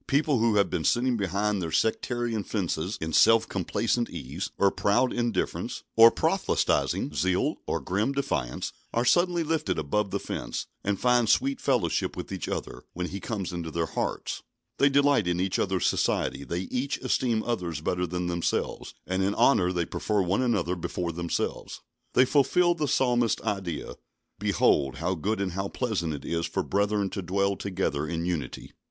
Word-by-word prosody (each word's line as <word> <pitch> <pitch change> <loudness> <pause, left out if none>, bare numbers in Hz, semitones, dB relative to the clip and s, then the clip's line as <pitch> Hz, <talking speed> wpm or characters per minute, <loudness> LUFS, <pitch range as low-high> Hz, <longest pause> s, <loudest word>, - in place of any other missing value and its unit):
People 145 -2 +2
who 115 -1 +3
have 100 -1 +4
been 80 - -1
sitting 125 +5 +2
behind 100 0 0
their 80 -2 -3
sectarian 115 +4 0
fences 90 -2 -2
in 80 0 -4
self 115 +5 +5
complacent 115 +5 -1
ease, 70 +8 -5
or 100 -1 +4
proud 100 +6 +2
indifference, 120 -5 -2
or 115 +1 +10
proselytising - - 0
zeal, 95 0 +1
or - - 0
grim 105 +8 0
defiance, 80 - -2 0.2
are 120 +1 +2
suddenly 175 +5 +3
lifted 155 - -1
above 95 +7 0
the - - -2
fence, - - -4 0.2
and 100 -1 -1
find 120 -2 +3
sweet 135 +1 +2
fellowship - - 0
with - - -6
each - - -4
other, - - -4
when 90 0 -3
He 100 - -5
comes 95 -4 -4
into 85 -2 -4
their 85 +1 -1
hearts. - - -3 0.4
They 140 - +5
delight 140 -7 +3
in 90 0 0
each 95 0 0
other's 95 -1 0
society; - - 0
they 85 +5 -3
each 125 +8 -2
esteem 115 -4 0
others 90 -10 -2
better 90 +3 -1
than 90 +1 -3
themselves, 85 -1 -2
and 95 +1 -1
in 100 +2 +1
honour 90 -10 +4
they 85 -2 -1
prefer 105 +2 0
one 95 +6 +1
another 105 -8 +1
before 85 0 -3
themselves. 85 +1 -3 0.4
They 130 - +6
fulfil 175 +6 +3
the 155 -3 -2
Psalmist's 120 -4 +2
ideal: 95 -6 -3 0.4
"Behold, 65 -1 +2
how 85 +7 -1
good 100 +6 -2
and 100 -2 -1
how 95 +3 -2
pleasant 100 -9 -2
it 70 -2 -6
is 85 0 -1
for - - -2
brethren 100 0 0
to 100 - -3
dwell 100 +2 0
together 95 -7 -2
in 85 0 -2
unity." 80 -8 -4
100 Hz, 170 wpm, -27 LUFS, 85-120 Hz, 0.4 s, or